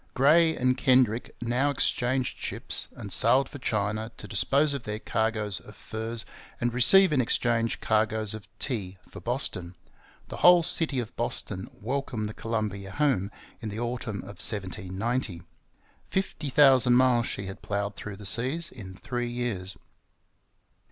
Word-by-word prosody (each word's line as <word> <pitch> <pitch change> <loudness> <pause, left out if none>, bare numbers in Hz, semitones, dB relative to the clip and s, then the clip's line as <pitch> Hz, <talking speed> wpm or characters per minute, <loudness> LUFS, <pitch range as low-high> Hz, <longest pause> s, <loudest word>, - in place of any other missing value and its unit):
Gray 160 +5 +5
and 130 0 +2
Kendrick 125 -3 +2
now 125 +4 +1
exchanged 130 -2 0
ships, - - -3
and 100 -2 -5
sailed 135 +7 +5
for 140 - -10
China 110 0 -2
to 105 - -9
dispose 140 +9 +2
of 140 - -3
their 105 -2 -4
cargoes 110 -3 -1
of 105 - -14
furs 110 +2 -3 0.3
and 120 -1 -1
receive 165 +9 +6
in 135 - +3
exchange 115 -1 0
cargoes 110 -1 +2
of 110 -2 -9
tea 100 -8 -4
for - - -11
Boston. 95 -8 -3 0.5
The - - -6
whole 175 -1 +7
city 165 -4 +1
of 120 -4 -4
Boston 95 - -3
welcomed 125 -2 -3
the 105 - -7
Columbia 105 -4 -3
home 100 -5 +1 0.3
in 110 - -4
the 105 +2 -5
autumn 120 -3 -3
of 100 +1 -7
1790. 100 0 -1 0.7
Fifty 185 -6 -2
thousand 130 -3 +5
miles 125 -2 +4
she 100 - -4
had 95 0 -8
ploughed 100 0 -3
through 105 -1 -7
the 105 - -10
seas 135 - 0
in 95 -6 -10
three 120 +4 -4
years. 115 -6 -4
115 Hz, 150 wpm, -27 LUFS, 105-130 Hz, 0.7 s, whole